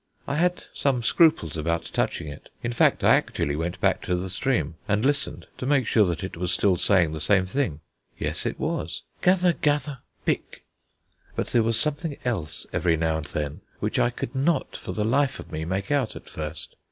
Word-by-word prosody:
I 140 - -1
had 180 +2 +1
some 130 -4 +1
scruples 110 - +4
about 85 +2 0
touching 85 - -1
it. 75 - -9
In 120 - -1
fact, - - +3
I - - +7
actually 70 - -1
went 85 +3 -3
back - - +2
to 90 - +1
the 90 +1 -3
spring 90 - 0
and 105 +3 +1
listened, 140 +1 0
to 125 - -3
make 140 -3 +3
sure 110 -1 +4
that 85 +1 -2
it 95 - -5
was 90 +1 -2
still 95 -3 +3
saying 90 -3 +3
the 80 - -4
same 95 0 +3
thing. 95 - -1 0.4
Yes, - - -2
it - - -4
was: - - -2 0.2
"Gather 180 -1 +4
gather, 145 -3 0 0.3
pick." - - -2 0.7
But - - -2
there 120 - +4
was 115 0 +2
something 150 +1 -1
else 95 - -2
every 85 -2 +2
now 80 0 +1
and 80 - -5
then 75 -1 -4 0.2
which - - -1
I - - +4
could 120 -1 -5
not 140 +2 +1
for - - -6
the 105 - -1
life 135 +4 +2
of - - -10
me 80 +1 -3
make 95 - -2
out 140 -6 +1
at - - -10
first. 75 0 -5
105 Hz, 200 wpm, -26 LUFS, 85-140 Hz, 0.7 s, I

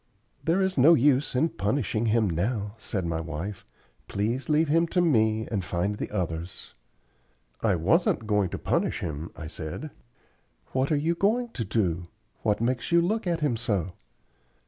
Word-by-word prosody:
"There 170 +4 +2
is 190 -6 0
no 160 +6 +8
use 140 -1 +3
in 160 +6 +3
punishing 110 0 -1
him 110 -1 +3
now," 100 +4 -1
said 95 -4 -3
my 85 -1 -1
wife. 85 +5 -5 0.4
"Please 115 +9 -2
leave 155 +1 +3
him 165 +3 +3
to 180 - 0
me 110 -9 +2
and 100 -4 -1
find 90 +4 -1
the - - -3
others." 85 0 -4 0.9
"I 105 -5 +3
wasn't 110 - +2
going 105 -3 +1
to - - -4
punish - - 0
him," 80 +1 -4
I 80 - -7
said. 80 -1 -6 0.8
"What 130 +3 0
are - - +4
you 160 +4 +1
going 220 +8 +1
to 125 - -4
do? 90 -5 -1 0.3
What 105 -1 +1
makes 125 +3 -1
you 170 - +6
look 200 +4 0
at 170 -2 0
him 145 -6 +1
so?" 100 -6 -1
110 Hz, 170 wpm, -27 LUFS, 95-150 Hz, 0.9 s, no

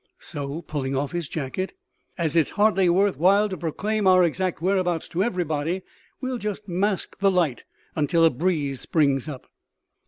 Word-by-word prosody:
So," 145 +3 -5
pulling 135 -3 -3
off 140 +1 -1
his 175 -4 -3
jacket, 160 +6 -3 0.4
"as 165 -4 -1
it's 165 -3 +4
hardly 205 -3 +4
worth 195 +3 +3
while 200 +5 +4
to 190 - -3
proclaim 195 +6 -1
our 185 -1 +6
exact 180 +2 0
whereabouts 180 -2 0
to 175 - -1
everybody, 175 -3 -1 0.4
we'll 255 -2 -3
just 210 0 -4
mask 190 +2 -1
the 200 0 +4
light 175 -9 0 0.3
until 165 +2 +3
a 165 - +5
breeze 145 -2 -1
springs 140 -3 +1
up." 135 -4 -8
175 Hz, 160 wpm, -24 LUFS, 150-190 Hz, 0.4 s, our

